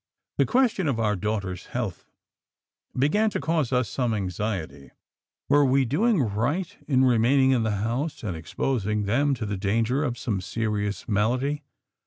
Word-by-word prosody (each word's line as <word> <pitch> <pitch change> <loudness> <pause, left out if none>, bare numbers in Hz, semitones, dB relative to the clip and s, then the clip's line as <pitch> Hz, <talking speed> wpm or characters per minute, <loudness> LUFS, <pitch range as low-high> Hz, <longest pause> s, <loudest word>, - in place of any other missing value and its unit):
The - - +4
question 240 -9 +2
of 130 -5 0
our 105 -2 +1
daughters' 95 -2 -3
health 115 -8 -4 0.9
began 180 +12 +3
to - - -3
cause 160 -6 0
us 125 -2 +2
some 120 0 -1
anxiety; 90 -7 -4 0.6
were 145 0 +5
we 135 0 +3
doing 190 - +2
right 145 - -1
in 130 -2 +3
remaining 130 +3 +4
in 125 -3 +3
the 110 - 0 0.2
house 130 +7 -2
and 95 -6 -3
exposing 105 - -1
them 135 +7 +2
to 115 -3 -4
the 100 -1 -3
danger 115 +8 +1
of 120 -4 -2
some 110 -7 -2
serious 105 +1 -2
malady? 125 +8 0
120 Hz, 155 wpm, -25 LUFS, 105-140 Hz, 0.9 s, were